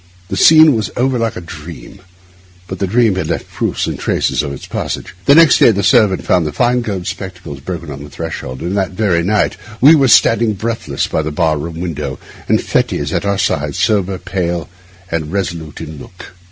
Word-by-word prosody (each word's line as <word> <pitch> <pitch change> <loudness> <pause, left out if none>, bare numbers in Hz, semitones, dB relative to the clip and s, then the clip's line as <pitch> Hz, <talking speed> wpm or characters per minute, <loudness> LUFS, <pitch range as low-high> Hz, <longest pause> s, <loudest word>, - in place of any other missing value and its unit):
The - - -3
scene 155 -3 +7
was 110 -3 -2
over 130 0 +1
like 115 -1 -1
a - - -6
dream, 85 +3 -10 0.6
but 95 +1 -7
the 95 - 0
dream 115 +1 +3
had 95 - -2
left - - -3
proofs - - -2
and - - -4
traces - - 0
of 75 -2 -4
its 70 - -8
passage. 95 - -5
Next 160 +1 +6
day - - +7
the 100 -3 0
servant 95 -1 +3
found 90 -4 +2
the - - -3
fine 120 - +1
gold 100 -6 -4
spectacles 90 -9 -7
broken 85 +1 -6
on 70 +1 -8
the 75 - -10
threshold, 70 -4 -6
and 90 +3 -3
that 95 -2 -1
very 95 -4 +1
night 100 +3 0 0.2
we 145 +5 +7
were 145 -4 +4
all - - +2
standing 115 -1 +4
breathless 115 +3 -2
by - - -1
the 80 - -3
bar 80 0 +1
room 80 +2 -6
window, 75 -6 -4 0.3
and - - +3
Fettes - - -1
at - - -1
our 100 0 0
side, 75 -7 -1
sober, 100 -4 +1
pale, 90 -3 -3 0.4
and 80 -2 -3
resolute 85 -6 -4
in 75 -1 -8
look. 90 - -12
95 Hz, 205 wpm, -16 LUFS, 80-110 Hz, 0.6 s, scene